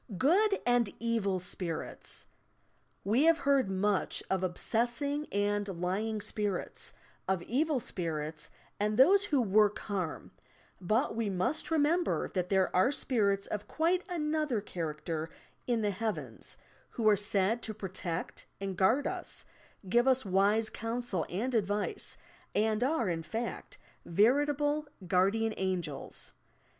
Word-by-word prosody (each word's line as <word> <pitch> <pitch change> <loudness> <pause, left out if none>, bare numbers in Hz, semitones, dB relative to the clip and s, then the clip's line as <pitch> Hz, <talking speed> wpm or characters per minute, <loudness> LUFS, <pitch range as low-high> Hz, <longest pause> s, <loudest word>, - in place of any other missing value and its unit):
GOOD 395 - +3
AND 245 -3 +3
EVn, 225 -5 0
SPIRITS 175 -2 -3 0.8
We 230 +10 +3
have 330 0 +6
heard 275 -8 +2
much 195 +1 0
of 190 -1 +1
obsessing 240 +10 0
and 205 0 0
lying 210 +5 -1
spirits, 205 -2 -3 0.3
of 190 -2 0
evil 290 - +1
spirits 155 -7 -4 0.3
and 210 +1 0
those 385 +10 +6
who 295 -9 +2
work 210 -2 +3
harm, 185 -6 -4 0.5
but 215 +7 +1
we 225 -2 0
must 195 +10 0
remember 325 +2 +2
that 180 -1 -1
there 190 -1 +2
are 185 +9 +4
spirits 205 -8 +1
of 210 0 -5
quite 345 +6 +1
another 305 -7 0
char 170 -6 -4
acter 155 +1 -4 0.4
in 235 -3 +1
the 205 - +1
"Heavens," 215 +2 -4 0.3
who 225 -2 -1
are 210 - +7
said 205 +2 +1
to 220 - -3
protect 185 -4 -5
and 195 -1 -3
guard 220 +10 +3
UB, - - -3 0.6
give 240 +6 +3
us 260 -2 +3
wise 200 +3 +2
counsel 230 -6 -3
and 230 +9 -2
advice, 205 -2 0 0.4
and 220 +2 +2
are, 260 -5 +1
in 170 -2 -1
fact, 225 +8 -5 0.3
veritable 290 - +2 0.2
"Guardian 200 +5 +2
Angels." 180 -6 -3
215 Hz, 130 wpm, -31 LUFS, 190-255 Hz, 0.8 s, are